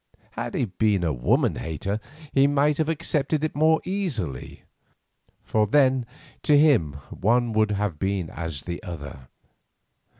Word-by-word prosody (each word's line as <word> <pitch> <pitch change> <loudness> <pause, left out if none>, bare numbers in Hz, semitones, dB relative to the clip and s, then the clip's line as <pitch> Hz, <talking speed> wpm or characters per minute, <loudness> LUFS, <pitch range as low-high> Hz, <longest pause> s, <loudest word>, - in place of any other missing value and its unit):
Had - - -5
he - - +1
been 105 -2 +1
a 80 -3 +1
woman - - +1
hater, 95 +6 -3 0.3
he 135 0 +5
might 145 +1 +2
have 160 0 +1
accepted 155 -1 0
it 155 - -2
more 160 +2 +4
easily, 140 - -3 0.8
for 110 -1 +1
then 130 0 +3 0.3
to 150 - +4
him 135 - +4 0.2
one 120 +3 +1
would 110 0 +2
have 100 -6 -2
been 95 -4 -1
as 80 -5 -5
the 85 -1 -5
other. 75 - -8
110 Hz, 140 wpm, -25 LUFS, 85-145 Hz, 0.8 s, he